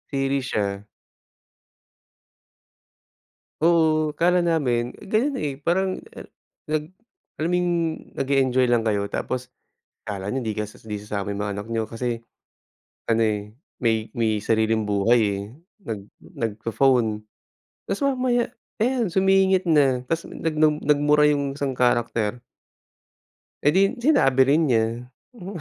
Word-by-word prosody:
Series 135 -1 -1
siya. 100 -1 -2 2.8
Oo, 160 -2 +3
akala 180 +1 +3
namin 135 -9 +1 0.2
ganyan, 245 +8 0
eh, 145 - -2
parang 185 +4 0 0.2
a - - -8 0.4
nag 155 0 -2 0.5
alam 160 +2 -1
mo - - +4
yung 175 0 0 0.5
nag-eenjoy 130 -2 +2
lang 120 -1 +2
kayo 105 -3 0
tapos 125 +4 -4 0.5
akala 100 -2 -4
niyo 130 +1 -2
di 110 - -1
kas 105 0 -5
'di 105 -2 -5
sasama 100 -1 -4
yung 100 - -4
mga 105 0 -2
anak 100 +1 -6
niyo 115 -1 0
kasi, 115 0 -3 0.9
ano, 115 0 +2
eh, 105 -1 -2 0.2
may 110 -2 0
may 110 -3 0
sariling 110 0 +1
buhay, 105 +3 +3 0.2
eh, - - -4 0.5
nag 105 -3 -4 0.2
nagpo-phone 115 0 0 0.7
tas 195 - -2
mamaya, 255 -3 +1 0.3
ayan 235 -1 +1
sumingit 190 +1 +3
na 135 -6 +3
tas 165 +5 -3
nag 160 -1 -3
nag 155 -1 +3
nagmura 150 0 +4
yung 140 -2 +1
isang 140 -2 -1
character. 120 -2 +1 1.3
Eh, 145 - +5
'di 175 +6 +3
'yon 195 - -1
sinabi 235 - +4
rin 150 +4 +4
niya. 115 -5 +3 0.5
Hmm. 195 -1 -8
130 Hz, 130 wpm, -23 LUFS, 110-165 Hz, 2.8 s, Eh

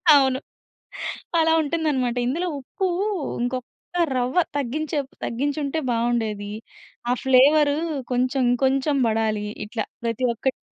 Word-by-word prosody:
అవును. 265 -2 +4 1.0
అలా 320 0 +4
ఉంటుందన్నమాట, 285 -6 0
"ఇందులో 340 +8 0
ఉప్పు 375 +8 -3 0.6
ఇంకొక్క 250 0 -2 0.5
రవ్వ 250 +7 +1 0.2
తగ్గించే 290 +3 -1 0.3
తగ్గించి 280 +5 -1
ఉంటే 280 +3 -1
బావుండేది. 225 -3 0 0.6
ఆ - - +4
ఫ్లేవరు 285 +3 +5 0.4
కొంచెం 255 +2 +1
ఇంకొంచెం 270 +3 +2
పడాలి" 215 -1 0 0.2
ఇట్లా 220 0 -3 0.2
ప్రతి 230 +2 0
ఒక్కటి 260 +3 -1
260 Hz, 105 wpm, -24 LUFS, 235-285 Hz, 1.0 s, ఫ్లేవరు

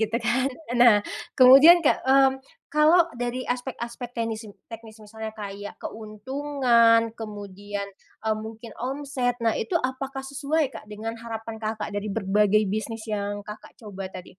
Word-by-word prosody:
gitu 220 +1 0
kan. 260 +3 +2 0.3
Nah, 240 -3 +8 0.4
kemudian, 270 +7 +9
Kak, - - +4
mmm, 270 0 +6 0.4
kalau 310 +4 +6 0.2
dari 245 +1 -2
aspek-aspek 245 -1 -5
teknisi, 225 -1 -3 0.2
teknis 225 -1 -10
misalnya 220 +1 -7
kayak 205 -1 -7
keuntungan 235 +1 +2 0.2
kemudian, 205 -1 -6 0.4
eee, 220 -1 +1
mungkin 225 0 -9
omset. 260 -1 -2
Nah, 225 - +3
itu - - -4
apakah 270 -1 -3
sesuai, 280 +3 -1
Kak, - - -9
dengan 215 +2 -5
harapan 225 -1 -6
Kakak 215 -1 -4
dari 205 +1 -3
berbagai 210 +1 +2
bisnis 220 +1 -4
yang 205 0 -3
Kakak 210 +1 -11
coba 195 -5 -8
tadi? 185 -1 -10
225 Hz, 140 wpm, -25 LUFS, 210-260 Hz, 0.4 s, kemudian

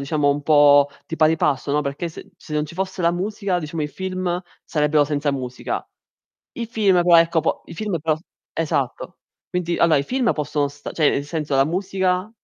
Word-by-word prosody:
diciamo 145 0 +1
un 145 +1 -1
po' 145 -1 +6 0.2
di 165 - -5
pari 160 +1 +4
passo, 140 -1 0
no, 150 - +2
perché 140 +4 -3
se 195 +5 -12
se 155 - -12
non 150 0 +1
ci 155 - -10
fosse 190 0 -3
la 170 - +4
musica, 195 +1 -2
diciamo, 155 0 -4
i 150 - -2
film 185 +1 -3 0.2
sarebbero 150 -1 +2
senza 145 0 -1
musica. 125 -2 -4 0.7
I 235 - -5
film 200 -6 +3
però 175 -1 +6
ecco, 165 0 +3
po 160 - -1
i - - -10
film 205 -2 -2
però 155 0 +1 0.4
esatto. 145 -5 -2 0.3
Quindi 175 -1 -1
allora 160 -3 +4
i 140 - -1
film 250 - +1
possono 150 -1 -1
stare 145 +1 -9
cioè 155 -3 +4
nel 140 - -1
senso, 150 -2 -3
la 135 - +5
musica 185 +2 -1
160 Hz, 200 wpm, -22 LUFS, 145-180 Hz, 0.7 s, po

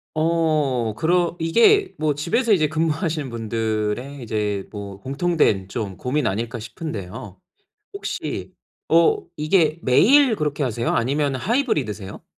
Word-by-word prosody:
어 155 -8 +1
그러 170 +7 +1
이게 365 - +4
뭐 155 -1 +1
집에서 205 - +1
이제 155 -5 +3
근무하시는 160 - -1
분들의 115 +3 -3
이제 105 -3 -2
뭐 100 -2 -7
공통된 135 - 0
좀 100 -5 -4
고민 145 +4 -1
아닐까 115 +4 -3
싶은데요. 110 - -7 0.5
혹시 400 - -5 0.3
어 165 +1 +4 0.2
이게 155 +1 +2
매일 250 - +5
그렇게 150 -4 -2
하세요? 120 -2 -1
아니면 140 +3 0
하이브리드세요? 130 - -2
145 Hz, 280 characters per minute, -22 LUFS, 110-165 Hz, 0.5 s, 매일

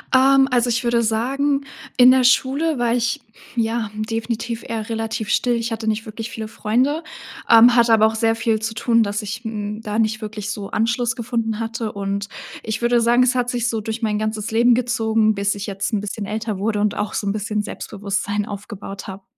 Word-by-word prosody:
Ähm, 270 +1 +6
also, 245 -1 +2
ich 235 +1 0
würde 235 -1 +2
sagen, 275 +6 0 0.3
in 250 0 +8
der 260 -1 +4
Schule 275 +4 +2
war 235 -1 +2
ich, 240 -1 0 0.3
ja, 225 -2 0
definitiv 225 +1 -3
eher 220 -2 -4
relativ 225 -1 -3
still. 245 0 +2
Ich 230 0 -2
hatte 225 0 -4
nicht 220 0 0
wirklich 225 +1 -6
viele 220 -1 -5
Freunde, 255 +9 0 0.5
ähm, 235 +1 +8
hatte 235 -1 +5
aber 220 0 +6
auch 220 - -2
sehr 225 0 +2
viel 225 -1 0
zu 225 0 -2
tun, 230 0 +2
dass 205 +1 -2
ich, 210 +2 -5
hm, 210 -1 -4
da 215 0 -2
nicht 220 0 0
wirklich 210 -1 -5
so 205 -2 -6
Anschluss 235 +2 0
gefunden 230 -2 -2
hatte 225 -1 -3
und 200 0 -3 0.4
ich 220 +1 -3
würde 240 0 +3
sagen, 240 +2 +4
es 255 +1 +2
hat 245 -1 0
sich 240 -1 0
so 225 - -1
durch 220 +2 -4
mein 210 -2 0
ganzes 215 0 -3
Leben 235 +2 +4
gezogen, 225 -3 +1
bis 200 +1 0
ich 200 0 -5
jetzt 200 +2 -3
'n 205 - +1
bisschen 205 +1 -5
älter 215 0 -3
wurde 210 +1 0
und 210 - +1
auch 210 - -3
so 200 - -2
'n - - +2
bisschen 210 0 -2
Selbstbewusstsein 205 0 -3
aufgebaut 200 -1 -8
habe. 190 0 -8
225 Hz, 205 wpm, -21 LUFS, 210-240 Hz, 0.5 s, in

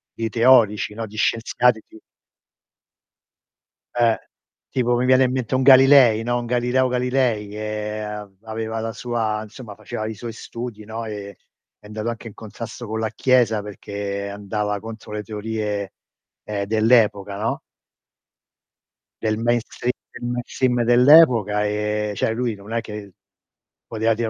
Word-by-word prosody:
di 115 0 -2
teorici, 115 -3 +4
no. 110 0 -5
Di 105 - -14
scienziati 115 0 +2
ti 110 - -15 2.0
Eh. 115 -2 +3 0.5
Tipo 120 -2 +1
mi 125 +1 +1
viene 130 0 +5
in 125 - 0
mente 130 -1 -2
un 130 - +2
Galilei, 130 -4 +7
no, 120 +1 0
un 120 - -6
Galileo 125 +2 +1
Galilei, 125 -4 0
che 105 0 -4
av 105 -1 -6
aveva 110 0 -4
la 115 0 -3
sua 110 -3 -2
insomma 110 -1 -11
faceva 110 0 -5
i 110 - -5
suoi 115 +2 -7
studi, 115 -2 -7
no, 110 +2 -6
e 100 -2 -7 0.4
è - - -22
andato 110 +2 -4
anche 115 0 -6
in 105 - -10
contrasto 115 +2 -8
con 110 +1 -3
la 110 -2 -2
chiesa 115 -3 +2
perché 100 0 -5
andava 105 0 -3
contro 110 0 -9
le 105 0 -3
teorie, 105 -1 -4 0.5
ehm, 100 -1 -3
dell'epoca, 110 -2 +2
no? 110 - -2 1.6
Del 110 -1 0
mainstream 120 +1 -1 0.2
del 120 - -5
mainstream 125 0 0
dell'epoca, 120 -5 +6
ehm, 105 0 -1
cioè 110 - 0
lui 120 -2 -2
non 100 +3 -10
è 115 - 0
che 105 -3 -9 0.7
poteva 115 0 +1
dire 115 0 -2
110 Hz, 145 wpm, -22 LUFS, 105-120 Hz, 2.0 s, Galilei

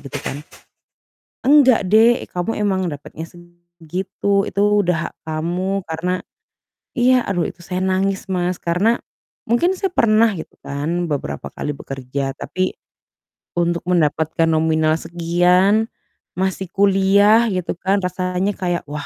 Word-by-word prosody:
gitu 140 - -7
kan. 140 - -5 1.0
"Enggak 260 -7 +5
dek, 225 +4 +4
kamu 180 +5 -2
emang 190 -2 +1
dapetnya 150 +3 -8
segitu 175 +3 -4
itu 200 - -2 0.2
udah 170 -2 0
hak - - -27
kamu 175 +5 -2
karena" 165 +3 -1 0.8
iya 250 0 +4
aduh 175 -4 0
itu - - -16
saya 180 +2 -4
nangis 195 +1 -1
Mas, 180 -1 0
karena 190 +8 +2 0.5
mungkin 290 +12 +2
saya 385 0 -1
pernah 225 -5 +4
gitu 170 -5 -8
kan 160 +5 -2
beberapa 75 - -4
kali 150 - -4
bekerja, 135 0 -4
tapi 185 0 -3 0.8
untuk 170 0 0
mendapatkan 160 -1 +1
nominal 160 0 +2
sekian, 180 +6 +2 0.5
masih 190 +1 -1
kuliah 200 +3 +4
gitu 185 -2 -2
kan, 195 +2 0
rasanya 180 +2 -1
kayak 175 -2 -1
wah, 145 0 -5
180 Hz, 125 wpm, -20 LUFS, 165-200 Hz, 1.0 s, Enggak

